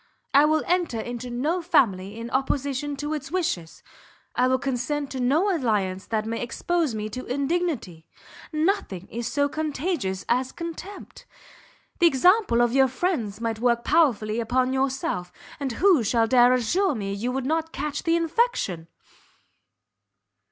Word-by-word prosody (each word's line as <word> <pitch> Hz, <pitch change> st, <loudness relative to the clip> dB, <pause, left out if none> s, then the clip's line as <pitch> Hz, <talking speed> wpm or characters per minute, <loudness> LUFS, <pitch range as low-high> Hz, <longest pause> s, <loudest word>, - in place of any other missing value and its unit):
I 285 Hz, +2 st, +7 dB
will 310 Hz, 0 st, +2 dB
enter 345 Hz, -9 st, 0 dB
into 240 Hz, +2 st, -5 dB
no 295 Hz, +9 st, -1 dB
family 205 Hz, -, +1 dB
in 230 Hz, +1 st, -6 dB
opposition 275 Hz, +1 st, -1 dB
to 295 Hz, +2 st, -3 dB
its 290 Hz, -3 st, -5 dB
wishes, 250 Hz, -, -2 dB, 0.5 s
I 250 Hz, -, +3 dB
will 260 Hz, 0 st, +3 dB
consent 275 Hz, +2 st, -2 dB
to 265 Hz, -, -4 dB
no 315 Hz, +11 st, +2 dB
alliance 200 Hz, -, -1 dB
that 215 Hz, -1 st, -1 dB
may 230 Hz, +1 st, -3 dB
expose 305 Hz, +3 st, -1 dB
me 215 Hz, 0 st, -3 dB
to 255 Hz, +4 st, -6 dB
indignity. 275 Hz, -, -2 dB, 0.4 s
Nothing 310 Hz, -, -1 dB
is 235 Hz, 0 st, -4 dB
so 285 Hz, -1 st, +2 dB
contagious 295 Hz, -, -2 dB
as 255 Hz, +2 st, +1 dB
contempt! 335 Hz, +4 st, -8 dB, 0.7 s
The 345 Hz, -, +6 dB
example 335 Hz, -, +4 dB
of 240 Hz, 0 st, +1 dB
your 270 Hz, 0 st, +5 dB
friends 250 Hz, -, -2 dB
might 225 Hz, -1 st, -2 dB
work 235 Hz, 0 st, +2 dB
powerfully 235 Hz, -9 st, +2 dB
upon 255 Hz, +3 st, +1 dB
yourself, 265 Hz, -10 st, -1 dB, 0.3 s
and 270 Hz, -4 st, -2 dB
who 360 Hz, +1 st, +4 dB
shall 225 Hz, +2 st, +2 dB
dare 245 Hz, +1 st, +5 dB
assure 270 Hz, -, +1 dB
me 200 Hz, -3 st, -3 dB
you 225 Hz, +5 st, -2 dB
would 265 Hz, 0 st, -2 dB
not 320 Hz, +2 st, -1 dB
catch 295 Hz, 0 st, -3 dB
the 330 Hz, 0 st, +2 dB
infection?" 330 Hz, -, 0 dB
260 Hz, 150 wpm, -25 LUFS, 230-315 Hz, 0.7 s, I